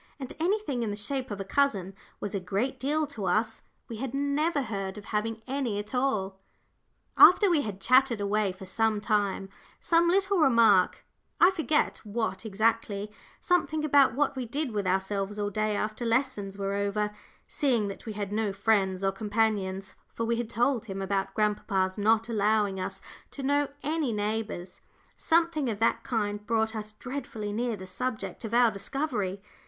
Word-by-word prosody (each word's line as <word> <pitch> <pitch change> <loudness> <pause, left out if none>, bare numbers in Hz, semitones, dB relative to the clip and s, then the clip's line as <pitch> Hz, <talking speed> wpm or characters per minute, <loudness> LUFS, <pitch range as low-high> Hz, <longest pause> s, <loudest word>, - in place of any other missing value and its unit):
And 265 -2 -6
anything 350 - 0
in 225 - -1
the 205 - -3
shape 255 +5 -3
of 205 -2 -5
a - - -2
cousin 195 -6 +1 0.3
was 205 - -4
a 200 - 0
great 205 +9 -2
deal 300 +4 0
to 240 -9 -6
us; 215 +5 0 0.3
we 230 - -6
had 265 +2 -4
never 285 +2 +1
heard 195 -3 -4
of 205 - -9
having 225 +1 -2
any 265 -5 -2
at 205 +3 -5
all. 210 -7 0 0.8
After 375 +1 +8
we 315 -4 +3
had 205 -7 -5
chattered 255 +1 +4
away 205 0 +1
for 185 +1 -10
some 220 +2 +1
time, 205 -2 0 0.3
some 335 0 +3
little 390 +1 +2
remark, 230 - +4 0.3
I 350 - +7
forget 315 -4 0
what 215 -2 -3
exactly, 215 -1 0 0.3
something 315 -4 +1
about 280 -5 +5
what 280 0 +1
we 255 -2 -4
did 280 +2 -2
with 205 -3 -2
ourselves 195 +2 -1
all 205 0 -2
day 215 +1 0
after 215 +3 -3
lessons 230 -5 -1
were 195 0 -2
over, 200 +1 -1 0.4
seeing 245 -8 +1
that 195 - -9
we 220 - -3
had 205 -1 -4
no 215 -1 0
friends 195 -2 +1
or 195 - +2
companions, 205 -2 -1 0.2
for 230 - -1
we 230 0 0
had 235 -1 -3
told 235 +1 +1
him 195 -3 -5
about 195 0 -2
grandpapa's 205 -2 0
not 220 +2 +3
allowing 210 -3 +1
us 185 - -5 0.3
to 275 - -6
know 285 +1 +2 0.2
any 305 -3 0
neighbours; 210 -4 -3 0.3
something 330 -5 +1
of 215 - -2
that 225 +2 +1
kind 210 -3 -2
brought 220 -1 +1
us 215 0 -5
dreadfully 230 -4 -5
near 235 +1 -1
the 190 -2 -9
subject 225 +7 -4
of 225 +1 -3
our 240 -2 +5
discovery. 205 -3 -3
220 Hz, 175 wpm, -28 LUFS, 200-265 Hz, 0.8 s, After